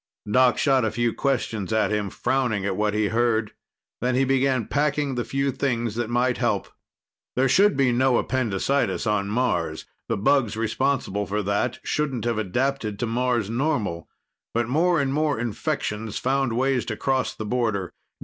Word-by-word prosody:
Doc 125 +3 +4
shot 135 -3 +3
a 110 - +2
few 120 +1 0
questions 115 -8 -1
at 110 -1 +2
him, 105 -2 -1
frowning 120 -4 0
at 100 -2 -1
what 105 +1 0
he 105 -1 +1
heard. 115 -2 +1 0.5
Then 125 +1 0
he 130 - +3
began 130 -3 +1
packing 145 -1 0
the 120 -1 -1
few 135 +2 -1
things 120 -4 -1
that 120 0 -2
might 125 +1 +1
help. - - 0 0.7
There 130 +1 +3
should 195 +6 +4
be 135 -3 +3
no 125 0 +3
appendicitis 130 +2 0
on 105 -2 0
Mars. 100 -9 -1 0.2
The - - 0
bugs 115 +1 +2
responsible 115 -3 -1
for 105 +1 -1
that 105 +5 0
shouldn't 135 -6 -1
have 115 -2 0
adapted 110 +1 -1
to 120 - -1
Mars 120 -2 0
normal. 115 - -1 0.5
But 120 -1 +1
more 165 +6 +2
and 135 -1 0
more 150 -4 +1
infections 110 -1 -3
found 135 -2 0
ways 130 +1 +1
to 110 - -4
cross 130 -1 0
the 110 - -5
border. 105 -5 -1
120 Hz, 170 wpm, -24 LUFS, 105-135 Hz, 0.7 s, Doc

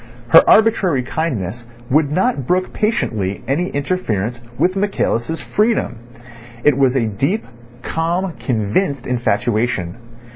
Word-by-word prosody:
Her - - +9
arbitrary 195 - +4
kindness 120 - -3 0.2
would 145 0 +3
not 185 - 0
brook 185 +1 0
patiently 110 - -1
any 165 +7 0
interference 125 - -2 0.2
with 185 +2 +2
Michaelis' 165 - -1
freedom. 215 - 0 0.7
It 150 -2 +4
was 135 -1 +2
a 125 -4 +2
deep, 135 - -1 0.4
calm, 170 +3 -1
convinced 125 - -1
infatuation. 115 -5 -1
140 Hz, 110 wpm, -18 LUFS, 115-185 Hz, 0.7 s, Her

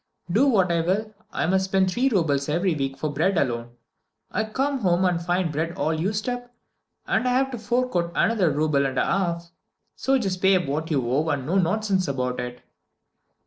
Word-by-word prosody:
Do 245 +10 +4
what 190 -9 +3
I 170 -1 +2
will, 205 +6 -1 0.2
I - - -1
must 190 +3 +2
spend 190 -1 +2
three 255 +6 +2
roubles 150 - +1
every 175 +4 +1
week 135 -2 -3
for 145 +2 -3
bread 170 +6 +1
alone. 120 -3 -1 0.6
I 220 - 0
come 270 +5 -1
home 185 -3 +2
and 175 -2 +1
find 175 0 0
the - - -4
bread 160 +3 -2
all 155 +3 0
used 200 +8 -2
up, 245 -1 -4 0.5
and 255 - +1
I - - +2
have 265 +1 +1
to 245 - -5
fork 245 +1 -1
out 170 -1 0
another 210 -7 +2
rouble 145 -1 +1
and 130 -1 -5
a - - +2
half. 170 -3 -1 0.4
So 270 0 +2
just 190 -7 -2
pay 190 0 +5
up 180 -2 +1
what 155 +4 -2
you 135 -6 0
owe, 145 +6 +1
and 140 -4 -1
no 185 +7 +2
nonsense 190 +1 +1
about 125 -2 -2
it!" 125 0 -6
175 Hz, 210 wpm, -24 LUFS, 150-210 Hz, 0.6 s, pay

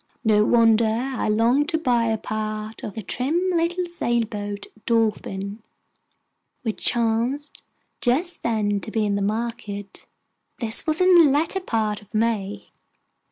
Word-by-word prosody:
No 215 -2 +4
wonder 225 0 +4
I 245 +3 -1
longed 235 +8 +2
to 320 - +1
buy 245 -7 +1
a 225 -1 0
part 215 0 -5
of 205 - -6
the 220 - -5
trim 265 - -1
little 350 +2 0
sailboat 220 -10 -2 0.2
Dolphin, 210 -2 -1 1.0
which 220 -3 -4
chanced 235 +5 0 0.4
just 305 +9 +1
then 210 -3 0
to 210 - -8
be 220 -1 0
in 205 - 0
the 200 - -1
market. 210 -1 -4 0.5
This 230 +5 +2
was 310 +2 +2
in 365 -1 +6
the 315 -4 +7
latter 310 +7 +1
part 220 - -1
of 210 +1 -14
May. 215 -3 -1
225 Hz, 140 wpm, -23 LUFS, 215-260 Hz, 1.0 s, the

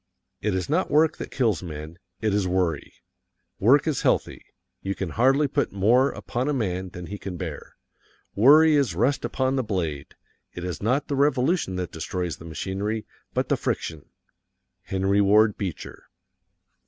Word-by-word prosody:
It 105 -2 0
is 95 - -2
not 165 +6 0
work 155 +1 +3
that - - -6
kills 110 - 0
men; 80 0 -8 0.2
it 110 -2 +1
is 100 -2 +1
worry. 90 -2 -1 0.7
Work 130 +8 +5
is 155 -5 0
healthy; - - 0 0.4
you 95 0 -3
can 95 - -4
hardly 135 - +3
put - - -1
more 115 +8 +3
upon 125 +4 -3
a - - +1
man 95 -6 -2
than 90 0 -8
he 100 +4 -7
can 90 -3 -6
bear. 80 -5 -7 0.6
Worry 150 +8 +6
is 125 - +1
rust 130 +9 +1
upon 130 0 0
the 130 - +1
blade. 85 - -3 0.4
It 90 - -6
is 90 -4 -4
not 130 +7 0
the 140 - -1
revolution 140 - +1
that 90 -2 -4
destroys 90 +1 -4
the 80 - -12
machinery 100 +7 -3 0.3
but - - 0
the - - +2
friction. 80 -3 -4 0.8
HENRY 95 +1 +1
WARD 105 +1 +4
BEECHER. 95 -5 -6
100 Hz, 165 wpm, -25 LUFS, 90-130 Hz, 0.8 s, Worry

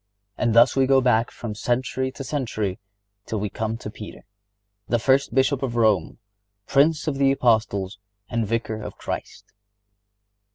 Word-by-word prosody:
And 115 -2 0
thus 120 +1 +6
we 135 -1 +3
go 135 0 +5
back 120 -2 +2
from 115 -3 -6
century 130 +4 -1
to 135 - -7
century 115 -8 -3 0.5
till 110 - -2
we 105 -1 -3
come 110 0 -3
to 105 -3 -8
Peter, 105 -1 -10 0.6
the 120 - +2
first 130 +1 +2
Bishop 135 0 +2
of 125 -3 -2
Rome, 110 -8 +2 0.5
Prince 150 +3 +3
of 140 -3 -1
the 135 -1 +4
Apostles 110 -6 +1 0.3
and 115 -3 -1
Vicar 110 0 -2
of - - -8
Christ. - - -7
120 Hz, 155 wpm, -24 LUFS, 110-135 Hz, 0.6 s, thus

